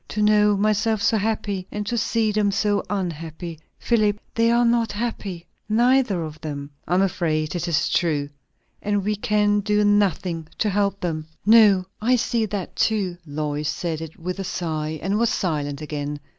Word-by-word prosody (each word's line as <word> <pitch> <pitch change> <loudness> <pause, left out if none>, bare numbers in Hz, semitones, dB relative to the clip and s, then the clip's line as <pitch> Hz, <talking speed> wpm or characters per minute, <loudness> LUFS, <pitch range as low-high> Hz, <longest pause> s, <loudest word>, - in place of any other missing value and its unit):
"To 210 - -1
know 210 -1 +4
myself 215 +2 +1
so 220 - +2
happy, 205 -3 -2
and 210 0 -3
to 235 - -2
see 225 -1 +1
them 210 -1 +2
so 205 +1 +1
unhappy. 165 -3 -4 0.2
Philip, 210 -3 +1
they 230 0 +3
are 240 +1 +4
not 235 -2 +2
happy, 205 -6 -4 0.2
neither 240 -1 +3
one - - -2
of 155 0 -9
them!" 145 -2 -6 0.2
"I 180 - +1
am 190 - +4
afraid 155 -5 0
it 175 0 -2
is 165 -3 +1
true. 150 -5 +1 0.5
And 205 -1 0
we 210 +2 0
can 210 0 +2
do 210 +1 +1
nothing 185 -5 +1
to 210 - +1
help 200 0 0
them." 155 -3 -3 0.2
"No, 210 -4 +6 0.2
I 245 +4 +3
see 235 -2 0
that 200 -3 -5
too." 200 -5 +1
Lois 150 0 -2
said 165 -3 -3
it 160 -1 -8
with 180 +3 -5
a - - -2
sigh, 155 -4 -3
and 200 +3 0
was 235 -1 +3
silent 145 -5 -2
again. 145 -1 -4
200 Hz, 180 wpm, -23 LUFS, 165-210 Hz, 0.5 s, No